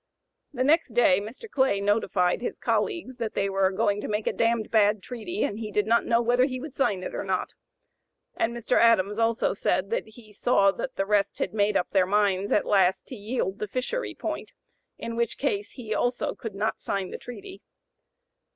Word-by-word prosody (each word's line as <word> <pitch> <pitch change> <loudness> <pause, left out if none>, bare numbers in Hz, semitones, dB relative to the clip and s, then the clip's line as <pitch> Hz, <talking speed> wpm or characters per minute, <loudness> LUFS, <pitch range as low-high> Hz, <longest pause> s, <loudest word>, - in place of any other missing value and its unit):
The 255 -3 -1
next 295 -3 +2
day 225 -6 +4
Mr. 225 - -9
Clay 265 - +1
notified 200 -2 +1
his 245 - -4
colleagues 335 - -1
that 225 -3 -4
they 195 - +1
were 195 -1 +2
going 200 +2 0
"to - - -4
make 210 0 -2
a - - 0
damned 230 -1 0
bad 210 -2 +3
treaty, 255 - -4
and 210 - -2
he 220 -2 -4
did 210 0 +1
not 230 +2 +2
know 235 +1 +3
whether 245 +2 +3
he 255 -2 -4
would 290 +1 -8
sign 200 -10 0
it - - -5
or - - -3
not;" - - -2 0.8
and 230 - 0
Mr. 235 +1 0
Adams 220 -2 +4
also 230 0 +1
said - - 0
that 480 - -1
he 220 -1 -16
saw 200 -2 +3
that - - -5
the 195 - -1
rest 200 -1 +1
had - - -2
made 210 -1 +2
up 180 - -2
their 190 -2 +3
minds 200 -1 +1
"at - - +3
last 190 -2 +3
to 260 - -6
yield 210 -2 -3
the 210 - -3
fishery 255 - -3
point," - - -5 0.4
in 230 0 -5
which 235 -1 -1
case 205 -8 -2
he 225 -4 -5
also 245 +3 0
could 220 -4 -7
not 215 +3 -1
sign 195 -2 -3
the - - -6
treaty. 385 +10 -10
220 Hz, 205 wpm, -26 LUFS, 200-245 Hz, 0.8 s, day